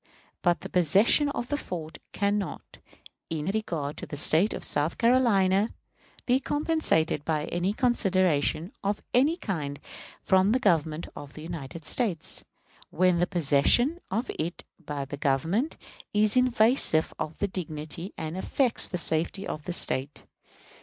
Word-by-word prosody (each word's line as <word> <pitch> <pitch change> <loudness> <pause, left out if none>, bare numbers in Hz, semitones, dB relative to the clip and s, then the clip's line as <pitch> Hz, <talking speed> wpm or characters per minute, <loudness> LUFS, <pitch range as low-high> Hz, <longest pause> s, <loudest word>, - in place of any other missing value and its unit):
But 175 -1 +2
the - - -7
possession 195 - +4
of 245 -3 -4
the 290 - 0
fort 165 - -7
can 205 +1 0
not, 200 - -7 0.5
in 155 -2 -3
regard 165 -9 -3
to - - -7
the 145 - -6
State 165 +8 +4
of - - -5
South 145 +3 -1
Carolina, 220 -5 +3 0.5
be 255 +1 +3
compensated 290 - 0
by 155 -1 -1
any 175 +4 -1
consideration 185 - +1
of 200 +1 -2
any 285 +7 +3
kind 150 - -4 0.4
from 190 +3 +3
the 255 - +2
Government 165 - +1
of 145 -1 -10
the 155 - -10
United 160 -2 -7
States, 205 -10 -2 0.5
when 180 -1 +2
the 175 - +2
possession 180 - +3
of 225 +6 -2
it 170 +3 -3 0.2
by 145 -2 -4
the 140 +1 -7
Government 160 - 0 0.4
is 210 +1 +3
invasive 240 -9 +4
of 160 -1 -4
the 205 - 0
dignity 165 0 -5
and 160 +1 -5
affects 240 +6 +1
the 180 - -3
safety 170 +4 -1
of 150 - -6
the 180 - -3
State. 140 -4 +1
180 Hz, 145 wpm, -27 LUFS, 155-220 Hz, 0.5 s, possession